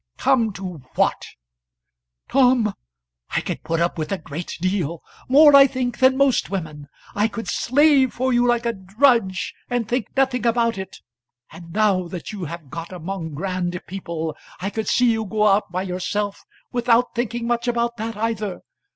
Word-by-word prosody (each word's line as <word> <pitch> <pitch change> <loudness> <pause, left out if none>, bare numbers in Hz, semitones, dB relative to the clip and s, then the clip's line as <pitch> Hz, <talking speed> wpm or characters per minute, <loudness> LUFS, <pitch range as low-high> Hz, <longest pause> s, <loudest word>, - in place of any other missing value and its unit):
"Come 230 -5 +2
to 185 -4 -7 0.2
what?" - - +1 1.0
"Tom, 250 -5 +3 0.6
I - - +4
could - - -4
put 165 0 -2
up 170 0 0
with 155 - -3
a 195 - 0
great 160 +1 -7
deal, 175 -3 -1 0.3
more 290 +2 +8
I 275 0 +9
think 245 -2 -3
than 260 0 +5
most 275 -3 +2
women; 155 -7 -5 0.3
I 210 +2 +2
could 225 0 -6
slave 280 0 +3
for 260 +1 -1
you 240 0 +3
like 240 -1 +1
a 235 - +1
drudge, 200 0 +1 0.2
and 245 -3 -1
think 245 -3 -1
nothing 260 -2 +2
about 230 -2 +1
it. 190 - -7 0.5
And 165 +1 -12
now 195 -2 +2
that 175 +3 -7
you 200 -5 -5
have 160 -3 -8
got 165 +2 -6
among 175 -3 -5
grand 180 +1 -2
people, 170 -4 -5 0.2
I 195 +2 -3
could 220 0 -3
see 245 -1 +3
you 220 -1 -1
go 210 +1 0
out 200 -2 +3
by 185 +1 -2
yourself 195 +2 -3 0.3
without 245 0 +2
thinking 240 0 -2
much 235 0 -1
about 235 0 0
that 225 0 -4
either. 215 -3 -2
210 Hz, 170 wpm, -22 LUFS, 180-240 Hz, 1.0 s, I